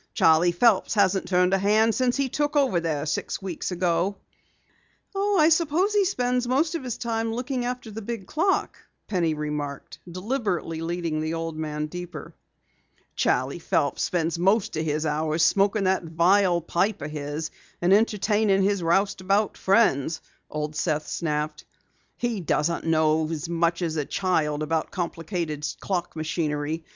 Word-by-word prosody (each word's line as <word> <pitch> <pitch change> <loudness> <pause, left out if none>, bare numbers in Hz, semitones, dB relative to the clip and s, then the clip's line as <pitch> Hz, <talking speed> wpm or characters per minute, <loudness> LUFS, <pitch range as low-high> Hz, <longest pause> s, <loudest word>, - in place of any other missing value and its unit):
Charley 165 +2 +5
Phelps 210 +3 +3
hasn't 195 -2 +2
turned 180 0 +3
a 195 - +3
hand 215 +3 +3
since 250 +1 +1
he 275 -1 +1
took 290 +3 -1
over 270 -11 +3
there 155 -3 -2
six 155 - -2
weeks 190 -4 -4
ago." 180 +2 0 1.0
"I 390 -5 +3
suppose 335 +5 +2
he 410 -2 +3
spends 250 -8 0
most 290 +7 +1
of 335 - -3
his 245 -2 -4
time 225 -1 -2
looking 245 +1 -2
after 245 -2 -4
the 220 +2 -6
big 225 -2 -5
clock," 355 - 0 0.3
Penny 170 -6 0
remarked, 150 -2 -5
deliberately 185 -5 -2
leading 165 -2 -2
the 160 +1 -2
old 165 -1 -4
man 150 -1 -3
deeper. 175 -1 -8 0.8
"Charley 130 +6 0
Phelps 145 -4 0
spends 170 -1 0
most 195 +2 +2
of 160 - -1
his 155 0 -1
hours 155 +1 0
smoking 200 +1 +2
that 190 0 +2
vile 175 +2 +3
pipe 180 +3 -1
of 150 - -5
his 150 +1 -4 0.3
and 175 +2 +3
entertaining 210 -1 +2
his 200 -1 +1
roustabout 195 +3 +1
friends," 165 - +2 0.3
Old 150 0 -4
Seth 155 -1 -1
snapped. 150 -2 -2 0.5
"He 240 -4 -1
doesn't 165 0 -1
know 155 -1 +2
as 160 -2 -4
much 170 +1 0
as 160 -2 -2
a 150 - -1
child 155 -6 0
about 160 +1 -1
complicated 165 -3 -4 0.2
clock 175 -4 -3
machinery. 155 0 -2
175 Hz, 150 wpm, -25 LUFS, 160-215 Hz, 1.0 s, Charley